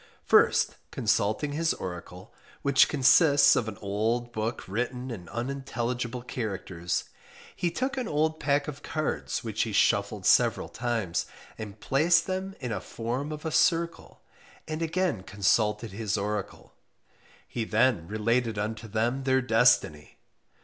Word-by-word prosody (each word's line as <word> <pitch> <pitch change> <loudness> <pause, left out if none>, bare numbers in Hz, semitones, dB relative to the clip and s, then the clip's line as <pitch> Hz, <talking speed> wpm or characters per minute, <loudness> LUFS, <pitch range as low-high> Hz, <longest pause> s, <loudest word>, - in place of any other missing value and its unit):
First - - +4
consulting 110 +8 0
his 160 +2 0
oracle, 90 +4 -8 0.3
which 140 -1 +5
consists 145 +1 +5
of 115 - 0
an 110 - -6
old 115 +4 -1
book 110 +2 -3
written 125 +5 -3
in 90 -7 -8
unintelligible 120 -1 -3
characters, 95 -7 -3 0.5
he 175 - 0
took 260 +10 -2
an 250 -3 -2
old 155 +1 0
pack 140 0 +1
of 145 -1 -6
cards 155 -2 -3
which 110 -2 -2
he 110 - -1
shuffled 100 - +1
several - - +3
times, 110 -8 -2 0.3
and 105 -1 -8
placed 160 +7 +3
them 190 +1 -4
in 125 -3 -4
a 110 - -3
form 125 +6 -4
of 150 +1 -7
a 160 - -1
circle, 165 +1 0 0.4
and 155 +1 -4
again 165 - 0
consulted 105 +2 +1
his 110 +1 -2
oracle, 105 0 -4 0.7
he 120 - -3
then 110 -5 +2
related 115 +2 0
unto 110 +2 -3
them 115 +5 -1
their 130 0 +3
destiny. 115 - +2
120 Hz, 135 wpm, -28 LUFS, 105-145 Hz, 0.7 s, which